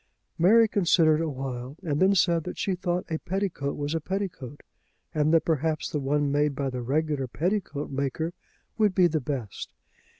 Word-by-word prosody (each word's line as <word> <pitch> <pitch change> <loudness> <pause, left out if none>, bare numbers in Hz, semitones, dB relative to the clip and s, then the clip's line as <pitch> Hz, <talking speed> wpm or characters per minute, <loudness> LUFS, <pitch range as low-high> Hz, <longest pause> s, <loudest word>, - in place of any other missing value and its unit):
Mary 225 +7 +6
considered 165 -6 +3
a 165 - -1
while, 130 0 -5
and 150 -3 -1
then 195 +2 +4
said 170 -2 +3
that 180 - -6
she 195 - 0
thought 180 -1 -2
a 160 - -1
petticoat 185 -7 -2
was 145 +1 -2
a 165 - -1
petticoat, 170 -7 -5 0.5
and 155 -1 +2
that 165 -1 +4
perhaps 160 -1 0
the 150 - -1
one 145 +1 0
made 145 0 +1
by 135 -1 -2
the 125 -1 -4
regular 145 +1 -1
petticoat 165 - -2
maker 140 +5 -2 0.5
would 210 -4 +3
be 185 - +5
the 160 -3 +1
best. 125 -7 -5
155 Hz, 175 wpm, -27 LUFS, 140-180 Hz, 0.5 s, Mary